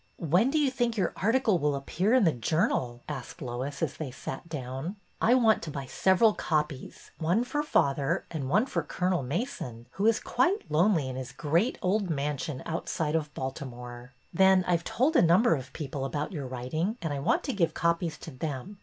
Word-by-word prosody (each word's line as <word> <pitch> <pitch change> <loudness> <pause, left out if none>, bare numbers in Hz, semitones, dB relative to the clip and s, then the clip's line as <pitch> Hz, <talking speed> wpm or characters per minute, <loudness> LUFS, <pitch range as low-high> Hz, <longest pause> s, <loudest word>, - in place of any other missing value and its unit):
When 175 - +2
do 310 - +1
you 290 -3 +3
think 240 -3 0
your 195 - 0
article 225 -2 +2
will 145 -1 +1
appear 180 - +1
in 255 - +5
the 165 - +5
Journal? 125 - 0
" - - -35
asked 140 -4 -6
Lois, 130 +3 -4
as 150 - -2
they 155 -4 -4
sat 130 +5 -7
down. 135 +4 -5 0.3
I 240 +3 +5
want 225 -4 +4
to 165 - -5
buy 140 -2 -5
several 190 - +3
copies, 150 -6 -3
— - - -37
one 175 +8 +2
for 295 +4 -1
father 140 - +1
and 145 -5 -3
one 215 - +3
for - - -1
Colonel 180 -3 -1
Mason, 130 - -4
who 200 +3 0
is 225 - +4
quite 380 - 0
lonely 165 -2 +3
in 130 0 -5
his 130 -1 -5
great 170 - +1
old 195 +1 +1
mansion 145 -2 -2
outside 160 -1 -2
of 155 -2 -1
Baltimore. 125 -2 -6 0.2
Then 190 +1 +5
I 180 - +4
've 170 - -2
told 275 - +1
a - - +7
number 175 +7 +5
of 130 -3 -4
people 140 -2 -5
about 145 +2 -3
your 145 -7 -4
writing 145 - -2
and 160 -3 -1
I 140 - -3
want 320 - +1
to 270 - -2
give 170 -6 +1
copies 170 -1 0
to 160 - -8
them. 150 +7 -5
160 Hz, 205 wpm, -28 LUFS, 135-205 Hz, 0.3 s, a